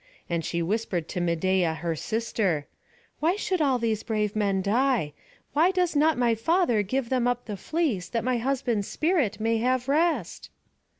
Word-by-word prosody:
And 170 -1 -1
she 170 +1 -2
whispered 185 -3 -2
to 180 - -3
Medeia 175 0 +1
her 165 0 -2
sister: 200 -5 -1 0.5
"Why 335 +4 +2
should 375 -4 -1
all 270 -4 +3
these 225 -3 -1
brave 210 -2 -1
men 200 -3 +1
die? 230 - +1 0.4
why 320 +5 +4
does 360 -3 0
not 310 0 +3
my 240 -2 +3
father 240 - +2
give 235 +5 -2
them 250 -2 +1
up 245 0 -1
the 210 - -5
fleece, 230 - -1
that 230 -2 -2
my 250 -1 0
husband's 245 -5 -1
spirit 300 - 0
may 225 +1 +1
have 255 +2 0
rest?" 295 - 0
230 Hz, 170 wpm, -26 LUFS, 195-275 Hz, 0.5 s, why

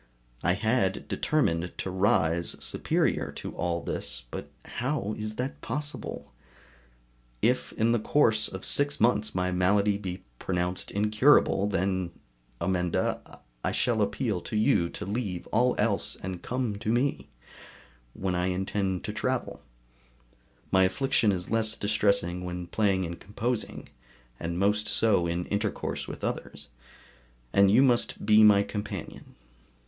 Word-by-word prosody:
I 90 - +2
had 105 -1 0
determined 90 - 0
to 95 - -3
rise 85 -3 +1
superior - - 0
to - - -7
all 85 -1 -2
this, 65 - -4
but - - -6 0.2
how 120 -5 -2
is 110 0 -5
it 130 +2 -3
possible? 150 0 -5 1.1
If - - +2
in 115 +1 +2
the 120 - +2
course 110 -2 +3
of 95 0 -7
six 145 0 +2
months 110 -3 +2
my 90 0 0
malady 100 +3 +2
be 95 -2 -6 0.2
pronounced 90 0 -1
incurable 105 0 +3
then, 95 -2 -1 0.5
Amenda! 90 -2 -1 0.2
I - - 0
shall - - +1
appeal 95 - -1
to 110 - -6
you 95 -5 +3
to - - -6
leave 100 -3 -3
all 125 +3 +3
else - - 0
and 90 -1 -6
come 125 -5 -2
to 110 0 -1
me, 130 +4 0 0.9
when 95 -1 -2
I 90 0 0
intend 95 0 -1
to - - -4
travel - - -2 1.1
(my 95 - +5
affliction 115 +1 +2
is 90 0 -4
less 110 -1 +1
distressing 100 -4 +1
when 90 0 -4
playing 95 0 +1
and 85 0 -6
composing, 115 +4 -4 0.5
and 85 +1 -3
most 105 +2 +1
so 100 -6 +3
in 85 +1 -2
intercourse 100 0 -2
with - - -8
others), 70 0 -4 0.8
and 100 0 +6
you 120 +7 +6
must 120 -5 +1
be 110 +1 +6
my 100 -1 +7
companion. 105 0 -7
100 Hz, 135 wpm, -28 LUFS, 90-110 Hz, 1.1 s, my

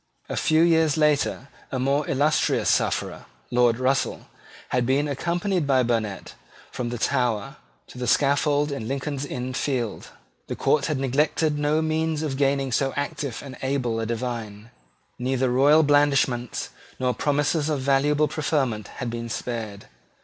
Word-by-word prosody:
A - - -3
few 160 +1 +3
years 160 -3 +3
later 150 -3 +1 0.2
a 130 - -2
more 140 +3 0
illustrious 145 +3 +2
sufferer, - - -1 0.3
Lord 120 -2 +3
Russell, 130 +2 0 0.4
had 125 -1 +1
been 135 +4 +1
accompanied 170 +3 -1
by 130 -2 +3
Burnet 110 -5 -2 0.4
from 120 -1 -3
the 120 - -4
Tower 120 -4 -1 0.3
to 125 - -12
the 125 - -3
scaffold 145 +2 +2
in 125 -6 -4
Lincoln's 140 +1 -3
Inn 125 0 -4
Fields. 125 -5 -2 0.4
The - - -4
court 145 -2 +1
had 155 -3 -1
neglected 150 +3 +1
no 150 +2 +1
means 160 0 -1
of 145 -4 -2
gaining 135 -1 +1
so 135 +2 +1
active 145 -3 -3
and 130 -2 -9
able 130 -4 -1
a 115 - -2
divine. 115 -2 -5 0.5
Neither 130 0 0
royal 145 +5 +5
blandishments 140 -4 +1 0.3
nor 125 -1 +1
promises 145 +2 0
of 145 -3 -1
valuable 145 +3 +2
preferment 135 -10 -1
had 120 -2 -5
been 115 0 -5
spared. 110 -3 -5
135 Hz, 150 wpm, -24 LUFS, 125-150 Hz, 0.5 s, royal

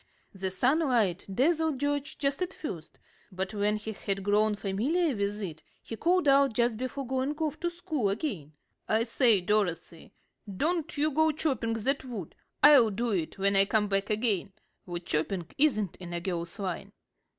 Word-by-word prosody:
The 190 -1 -3
sunlight 245 - +1
dazzled 315 - +1
George 285 0 -2
just 275 +2 -1
at 365 +1 -2
first, 170 - -7 0.3
but 190 +2 -4
when 210 0 +1
he 215 +1 -6
had 195 -2 -4
grown 210 +1 +2
familiar 250 - 0
with 205 +1 -2
it, 160 -5 -6 0.2
he 225 - -6
called 350 +5 +2
out 275 -2 +5
just 235 0 +1
before 255 +3 -4
going 265 +3 -1
off 310 -3 -2
to 345 - -1
school 315 - -2
again: 195 - -4 0.4
"I 220 +1 +3
say, 230 -3 +4
Dorothy, 180 -4 -1 0.5
don't 330 - -1
you 305 +2 +2
go 315 +2 +3
chopping 270 -7 -1
that 265 +6 0
wood. 225 -10 -7 0.3
I'll 280 -6 +8
do 230 +3 -2
it 175 -3 -2
when 200 +1 +2
I 195 0 +6
come 210 0 +1
back 195 0 0
again. 210 -3 0 0.3
Wood 175 0 -5
chopping 170 +4 -1
isn't 215 - +2
in 175 -1 -8
a 170 - -2
girl's 170 -1 -4
line." 195 +1 -5
220 Hz, 170 wpm, -29 LUFS, 195-280 Hz, 0.5 s, I'll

